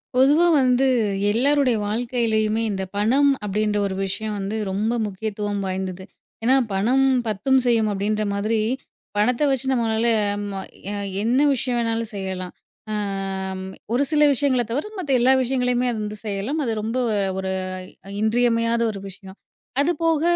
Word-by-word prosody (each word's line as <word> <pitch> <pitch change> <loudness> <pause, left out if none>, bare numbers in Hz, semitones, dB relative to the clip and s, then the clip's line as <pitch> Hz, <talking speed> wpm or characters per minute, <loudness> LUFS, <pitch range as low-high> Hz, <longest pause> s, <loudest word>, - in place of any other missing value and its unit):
பொதுவா 290 +7 +5
வந்து 255 +1 +3 0.4
எல்லாருடைய 260 +1 +3
வாழ்க்கையிலேயுமே, 225 -1 0
இந்த 190 -1 -2
பணம் 260 +8 +3 0.2
அப்டின்ற 210 +1 0
ஒரு 190 - -4
விஷயம் 210 +2 -3
வந்து 200 +3 -3
ரொம்ப 215 +5 0
முக்கியத்துவம் 205 0 -3
வாய்ந்தது. 190 0 -4 0.4
ஏனா, 255 +3 +4 0.2
"பணம் 245 +8 +2 0.2
10ம் 260 +6 +2
செய்யும்" 225 -3 +3
அப்டின்ற 210 +2 -1
மாதிரி 215 +3 0 0.6
பணத்த 235 +6 +2
வச்சு 270 -1 0
நம்மளால, 230 -2 +1 0.3
அமா, 205 -1 -4 0.6
என்ன 240 +4 +2
விஷயம் 255 -2 -1
வேணாலும் 230 -1 -1
செய்யலாம். 190 -2 -5 0.4
ஆ - - -1 1.0
ஒரு 255 +4 +3
சில 300 -1 +4
விஷயங்கள 265 -2 +2
தவர 285 - -1
மத்த 330 -7 -3
எல்லா 250 +2 +4
விஷயங்களையுமே 250 -1 +1
அது 225 - -4
வந்து 210 0 -5
செய்யலாம் 210 +9 -2
அது 235 - -1
ரொம்ப 225 +4 -2 0.4
ஒரு 190 0 -2 0.7
இன்றியமையாத 230 +1 +2
ஒரு 200 - -7
விஷயம். 190 0 -12 0.4
அது 305 +5 +2
போக 325 -2 +2
225 Hz, 135 wpm, -23 LUFS, 205-255 Hz, 1.0 s, பொதுவா